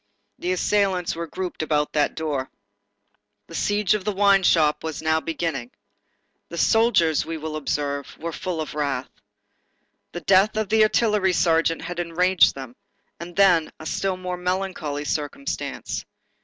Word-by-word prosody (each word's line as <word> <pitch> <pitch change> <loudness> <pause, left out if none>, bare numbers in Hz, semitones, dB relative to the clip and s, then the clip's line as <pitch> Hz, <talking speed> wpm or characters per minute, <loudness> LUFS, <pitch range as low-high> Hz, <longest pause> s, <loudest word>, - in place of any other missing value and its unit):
The 180 - -1
assailants 185 -2 +1
were 170 0 -4
grouped 180 +1 -5
about 150 -1 0
that 150 -1 +1
door. 145 -5 -2 1.0
The - - -14
siege 205 +2 +1
of 210 -2 -1
the 210 - -1
wine 200 0 +4
shop 155 -4 +3
was 160 -1 -5
now 160 0 +2
beginning. 160 -6 -3 0.8
The 170 - -7
soldiers, 200 -8 +3
we 165 0 -5
will 155 0 -5
observe, 145 -1 -3
were 170 +1 -5
full 180 -1 -4
of 155 - -6
wrath. 145 -2 -2 1.0
The 175 - -5
death 195 +4 +4
of 215 -2 -1
the 220 0 +4
artillery 210 -3 +3
sergeant 165 -1 +2
had 175 0 -5
enraged 180 +1 +3
them, 130 -3 -8 0.4
and 170 0 -8
then, 180 -5 +4
a 160 - -9
still 190 +3 -1
more 180 -1 -4
melancholy 180 -5 -2
circumstance. 150 - -3
170 Hz, 150 wpm, -23 LUFS, 155-190 Hz, 1.0 s, wine